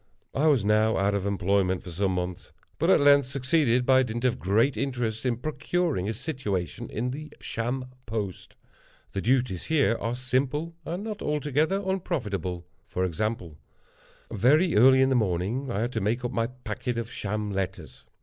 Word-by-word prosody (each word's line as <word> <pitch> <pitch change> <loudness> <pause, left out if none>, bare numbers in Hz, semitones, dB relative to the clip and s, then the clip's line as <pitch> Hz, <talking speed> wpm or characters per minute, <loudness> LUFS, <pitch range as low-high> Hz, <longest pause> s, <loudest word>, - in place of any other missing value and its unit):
I 150 +4 +2
was 135 -9 +3
now 110 +1 +3
out 100 +1 +2
of 100 -1 -1
employment 95 -1 +1
for 90 - -8
some 95 +2 0
months, 90 -1 -4 0.3
but - - +2
at - - +6
length 140 -2 +6
succeeded, 130 -2 +2
by 130 0 +5
dint 120 0 -2
of 125 -1 +1
great 110 +9 +2
interest, 125 -3 -2
in 120 -2 0
procuring 155 - -1
a - - -1
situation 105 - -3
in 125 +3 -2
the 155 +3 -7
Sham 125 +3 -3 0.2
Post. 105 -4 -4 0.6
The 95 - -3
duties, 120 -6 +1
here, 145 -7 +2
are 115 +1 -1
simple, 130 +6 -1
and 175 +5 -3
not 215 -2 -5
altogether 150 +6 0
unprofitable. 105 - -2 0.2
For 95 - -1
example:—very 110 - -1
early 130 +4 +7
in 130 - +3
the 135 - +2
morning 110 +5 0
I 105 -3 -1
had 120 +2 -1
to - - -2
make 115 +5 0
up 120 - -2
my 115 -2 0
packet 125 -1 -5
of 115 0 -4
sham 105 0 -3
letters. 95 -1 -5
120 Hz, 170 wpm, -27 LUFS, 100-135 Hz, 0.6 s, early